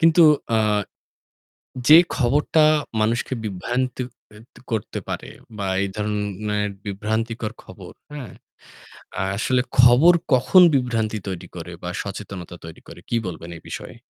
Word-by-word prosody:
কিন্তু 165 +1 +6 0.3
অ্যাঁ 105 -2 +2 1.1
যে 155 +2 +10 0.2
খবরটা 150 +4 +3 0.4
মানুষকে 115 +4 0
বিভ্রান্তি 120 +6 -2 0.3
এ - - -13 0.2
ক - - -23
করতে 110 -3 -3
পারে - - -5 0.3
বা 100 - -2 0.2
এই 100 - -1
ধরনের 105 0 -2 0.2
বিভ্রান্তিকর 110 +3 -3
খবর - - -12 0.2
অ্যাঁ 145 -6 -8 1.1
আসলে 125 +3 +1 0.2
খবর 125 +8 +7 0.2
কখন 130 +9 +6
বিভ্রান্তি 115 -4 0
তৈরি 95 -3 -5
করে 85 0 -7
বা 90 - -3
সচেতনতা 100 -3 -7
তৈরি 80 -1 -11
করে। - - -11
কী 120 - 0
বলবেন 85 -2 -7
এই - - -15
বিষয়ে? - - -7
110 Hz, 130 wpm, -22 LUFS, 100-125 Hz, 1.1 s, যে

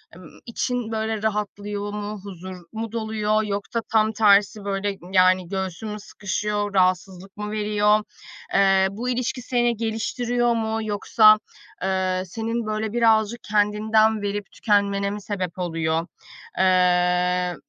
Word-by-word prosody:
ımm, 180 -2 -14
için 245 -1 -3
böyle 220 -1 -2
rahatlıyor 205 -1 -3
mu, 210 -1 -5
huzur 185 -1 -8 0.2
mu 225 0 -5
doluyor 220 -1 0
yoksa 205 +3 -3
tam 220 0 +3
tersi 205 -1 +3
böyle, 200 0 -2
yani 185 -1 +4
göğsün 190 +1 -4
mü 210 0 -5
sıkışıyor, 205 0 -3
rahatsızlık 185 +1 0
mı 210 0 -5
veriyor? 210 0 +2 0.5
Iıı, 195 -1 +4
bu 245 +2 -2
ilişki 250 0 -2
seni 240 -1 0
geliştiriyor 235 +2 0
mu 220 0 -1
yoksa, 215 +1 +5 0.4
ııı, 185 -1 0
senin 225 +4 -3
böyle 215 0 -2
birazcık 225 -1 +2
kendinden 215 +1 +2
verip 205 0 -4
tükenmene 200 -2 +1
mi 205 +1 -5
sebep 185 -3 -4
oluyor? 165 -1 -1 0.5
Iıı, 180 -1 +2
210 Hz, 125 wpm, -23 LUFS, 190-220 Hz, 0.5 s, yoksa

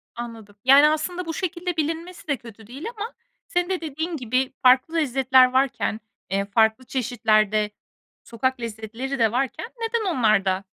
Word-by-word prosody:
Anladım. 225 -4 -8
Yani, 280 +3 +8
aslında 350 +4 -2
bu 325 - -4
şekilde 360 -1 -3
bilinmesi 330 +3 -3
de 285 -3 0
kötü 220 -2 -14
değil 275 - -9
ama 435 +3 -5 0.3
senin 355 +1 0
de 370 -3 -1
dediğin 320 +2 -4
gibi 255 +2 -1
farklı 255 +6 +4
lezzetler 265 -3 +4
varken, 260 -4 +1 0.3
eee, 195 +1 0
farklı 220 +4 +2
çeşitlerde 215 -5 +1 0.5
sokak 250 +2 -2
lezzetleri 230 +4 -5
de 225 -2 +3
varken 265 - -2
neden 455 -3 -1
onlar 215 -5 +3
da 190 0 0
260 Hz, 150 wpm, -24 LUFS, 225-320 Hz, 0.5 s, Yani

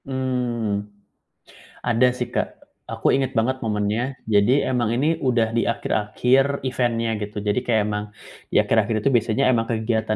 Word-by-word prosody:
Mmm, 125 -5 -2 1.0
ada 120 +1 +3
sih 125 -1 -4
Kak, - - 0 0.4
aku - - 0
ingat 135 -1 0
banget 130 +3 +1
momennya. 110 +4 -1
Jadi, 110 +6 +3
emang 125 -3 0
ini 155 +6 +1
udah 120 -5 +1
di 115 +1 0
akhir-akhir 125 +5 +1
event-nya 120 -3 0
gitu, 105 0 -5
jadi 105 +3 +1
kaya 115 -3 +1
emang, 105 0 -2 0.4
di - - -8
akhir-akhir 110 +1 +1
itu - - +3
biasanya 120 +3 +2
emang 115 -2 +1
kegiatan 110 -1 -1
115 Hz, 150 wpm, -22 LUFS, 110-130 Hz, 1.0 s, ada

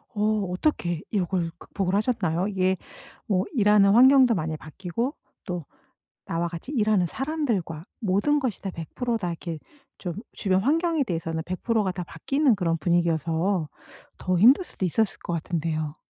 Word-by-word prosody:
어 210 -1 +1
어떻게 180 - 0
요걸 180 -3 0
극복을 190 -1 -3
하셨나요? 200 -5 0
이게 190 -2 +1 0.5
뭐 190 -2 +1
일하는 205 -4 +5
환경도 255 -1 +7
많이 160 -2 -2
바뀌고 190 - -4 0.3
또 175 -6 -4 0.6
나와 170 +1 -1
같이 170 - -7
일하는 210 -7 +2
사람들과 230 - -2 0.2
모든 215 +9 +2
것이 255 -6 -3
다 195 - -3
100% 230 +8 -3
다 180 -4 -3
이렇게 165 -1 -5 0.4
좀 175 -3 -4 0.2
주변 190 -2 +1
환경에 320 +2 +2
대해서는 165 -4 -3
100% 210 +4 0
가 185 - 0
다 180 -1 -5
바뀌는 275 - +1
그런 165 -3 0
분위기여서 170 0 +1 0.5
더 185 -1 0
힘들 260 - +6
수도 190 - -3
있었을 215 +4 0
것 175 - -4
같은데요. 155 -2 -2
190 Hz, 310 characters per minute, -25 LUFS, 170-225 Hz, 0.6 s, 환경도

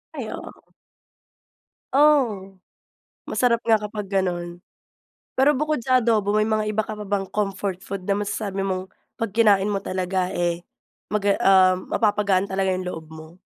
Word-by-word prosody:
Ay, - - -5
oo. - - -10 1.2
Oh! 255 -10 +3 0.7
Masarap 235 -2 +2
nga 225 -1 +4
kapag 210 -1 -6
ganun. 175 -3 -2 0.8
Pero 270 +3 +5
bukod 300 -1 -1
sa 255 0 +4
adobo 220 -4 +1
may 215 0 +2
mga 215 -1 0
iba 220 - +1
ka 215 - -6
pa 210 - -7
bang 195 -1 -2
comfort 195 -2 -3
food 195 -2 -6
na 200 - +2
masasabi 200 -1 -3
mong 190 -1 -2 0.3
'pag 225 -4 -3
kinain 205 -3 +4
mo 200 -1 -1
talaga 185 0 -1
eh, 175 -1 -1 0.5
maga 205 -1 +2
ah, 185 -1 +6
mapapagaan 200 0 +1
talaga 190 0 0
yung 185 0 -3
loob 165 -3 -6
mo? 160 +2 -12
200 Hz, 150 wpm, -23 LUFS, 185-215 Hz, 1.2 s, ah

